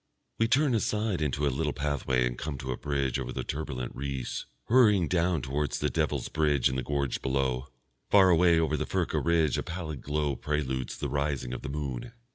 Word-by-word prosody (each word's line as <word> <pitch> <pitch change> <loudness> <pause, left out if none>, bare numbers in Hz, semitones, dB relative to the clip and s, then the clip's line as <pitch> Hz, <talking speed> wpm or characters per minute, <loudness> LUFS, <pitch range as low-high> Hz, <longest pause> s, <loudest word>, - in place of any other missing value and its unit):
We 115 - +4
turn 135 +3 +3
aside 105 -4 0
into 75 0 0
a 70 - +1
little 75 +2 -1
pathway 70 -3 0
and - - -2
come 75 +2 -4
to 65 -1 -4
a - - -1
bridge 70 -1 -1
over 65 -1 -4
the - - -3
turbulent 70 -5 -4
Reuss, 70 -2 -4 0.2
hurrying 105 -8 +5
down 85 -4 +1
towards 70 +2 -1
the - - -1
Devil's - - 0
Bridge 75 -4 +2
in 65 - -3
the 65 - 0
gorge 70 -1 -1
below. 65 -1 0 0.4
Far 95 -2 +6
away 85 0 +5
over 80 -1 +1
the - - -2
Furka - - 0
ridge 80 -4 +2
a - - 0
pallid 80 -5 -5
glow 75 -1 -1
preludes 65 -2 -2
the - - -2
rising 70 -3 -1
of 65 - -5
the - - -5
moon. 70 - -4
75 Hz, 200 wpm, -29 LUFS, 65-80 Hz, 0.4 s, Far